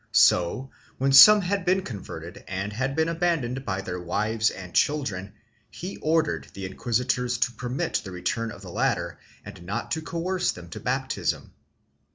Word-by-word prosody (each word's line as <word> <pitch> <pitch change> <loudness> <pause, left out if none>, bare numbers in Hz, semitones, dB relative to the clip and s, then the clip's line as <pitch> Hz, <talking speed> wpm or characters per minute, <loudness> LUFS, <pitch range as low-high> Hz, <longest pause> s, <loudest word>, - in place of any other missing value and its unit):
So, 125 +10 +3 0.3
when 135 +1 +1
some 210 +10 +10
had 195 +1 -1
been 185 +1 +2
converted 90 - -8
and 95 +2 -3
had 135 +4 -1
been 160 +1 +2
abandoned 165 -7 0
by 95 -6 -2
their 90 -2 -5
wives 110 +5 0
and 90 -3 -9
children, 105 -10 0 0.4
he 185 +3 -7
ordered 160 +1 0
the 95 -1 -5
inquisitors 125 +4 -1
to 115 +1 +1
permit 125 0 -2
the 95 - -7
return 115 +5 -2
of - - -11
the - - -9
latter - - -1 0.3
and - - -10
not 100 +6 -4
to 160 - 0
coerce 175 +3 -1
them 85 -1 -11
to - - -7
baptism. - - -2
125 Hz, 165 wpm, -26 LUFS, 95-160 Hz, 0.4 s, some